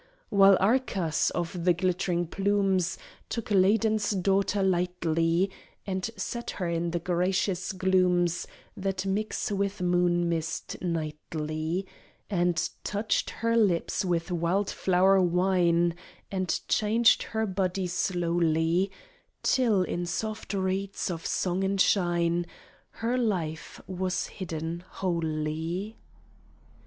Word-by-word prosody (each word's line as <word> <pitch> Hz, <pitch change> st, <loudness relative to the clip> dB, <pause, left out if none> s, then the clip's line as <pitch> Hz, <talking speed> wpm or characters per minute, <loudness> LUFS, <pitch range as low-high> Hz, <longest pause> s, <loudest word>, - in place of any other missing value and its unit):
While 195 Hz, -1 st, +6 dB
Arcas, 195 Hz, -6 st, +1 dB
of 175 Hz, 0 st, -3 dB
the 180 Hz, 0 st, +5 dB
glittering 175 Hz, -1 st, 0 dB
plumes, 195 Hz, 0 st, +1 dB, 0.3 s
Took 230 Hz, -2 st, -4 dB
Ladon's 215 Hz, +2 st, +3 dB
daughter 195 Hz, 0 st, +1 dB
lightly, 175 Hz, -1 st, +1 dB, 0.3 s
And 190 Hz, +1 st, -2 dB
set 235 Hz, 0 st, -4 dB
her 180 Hz, -, -1 dB
in 170 Hz, 0 st, -1 dB
the 170 Hz, -, -1 dB
gracious 180 Hz, +2 st, 0 dB
glooms 185 Hz, -2 st, +2 dB, 0.3 s
That 190 Hz, 0 st, -2 dB
mix 210 Hz, +2 st, -1 dB
with 200 Hz, 0 st, -1 dB
moon 175 Hz, -1 st, +2 dB
mist 165 Hz, -1 st, -3 dB
nightly; 155 Hz, +1 st, -3 dB, 0.5 s
And 175 Hz, -3 st, +1 dB, 0.2 s
touched 210 Hz, +1 st, 0 dB
her 230 Hz, 0 st, -1 dB
lips 200 Hz, -7 st, +2 dB
with 175 Hz, -1 st, -1 dB
wild 180 Hz, +4 st, 0 dB
flower 190 Hz, +1 st, +3 dB
wine, 175 Hz, -1 st, +2 dB, 0.4 s
And 185 Hz, -3 st, -1 dB
changed 225 Hz, +2 st, +4 dB
her 220 Hz, 0 st, -2 dB
body 190 Hz, -1 st, -1 dB
slowly, 175 Hz, 0 st, +1 dB, 0.5 s
Till, 225 Hz, -8 st, +3 dB
in 175 Hz, -1 st, -3 dB
soft 215 Hz, +2 st, -3 dB
reeds 190 Hz, 0 st, -1 dB
of 165 Hz, -1 st, -4 dB
song 185 Hz, +1 st, 0 dB
and 195 Hz, 0 st, 0 dB
shine, 175 Hz, -2 st, +2 dB, 0.4 s
Her 240 Hz, +3 st, -2 dB
life 175 Hz, -9 st, -2 dB
was 185 Hz, 0 st, -2 dB
hidden 165 Hz, -2 st, -5 dB
wholly. 165 Hz, +3 st, -2 dB
185 Hz, 110 wpm, -28 LUFS, 170-195 Hz, 0.5 s, While